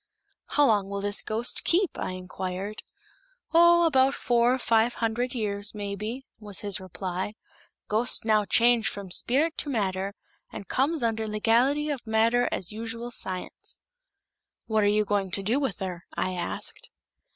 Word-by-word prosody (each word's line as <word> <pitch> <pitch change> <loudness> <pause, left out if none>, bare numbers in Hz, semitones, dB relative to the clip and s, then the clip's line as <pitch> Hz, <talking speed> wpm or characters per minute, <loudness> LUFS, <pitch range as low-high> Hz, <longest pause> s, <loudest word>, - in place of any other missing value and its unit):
"How 290 - +3
long 205 -6 +2
will 200 0 -3
this 205 0 +2
ghost 225 +3 +1
keep?" 365 +1 +3
I - - -3
inquired. 185 +2 -5 0.7
"Oh, 340 +1 +7
about 270 -3 +3
four, 240 +1 +2
five 230 -1 +2
hundled 240 +3 -1
years, 205 -2 -2
maybe," 210 +5 -5
was 210 -3 0
his 205 -1 -1
reply. 185 +2 -5 0.5
"Ghost 220 +2 +1
now 215 -2 +3
change 235 +1 +4
from 195 -2 -7
spilit 295 - +1
to 295 - -2
matter, 200 -4 -1 0.4
and 200 - -8
comes 285 - +1
under 225 -1 0
legality 245 +8 +2
of 265 -5 -5
matter 230 +2 +3
as 185 - -2
usual 230 +2 -5
science." 185 -5 -4 0.9
"What 220 -2 +1
are - - +4
you 210 +1 +3
going 200 -2 0
to 195 +2 0
do 230 +8 +2
with 265 -10 -2
her?" 180 -3 -6
I 185 - -1
asked. 175 - -4
220 Hz, 150 wpm, -27 LUFS, 200-245 Hz, 0.9 s, Oh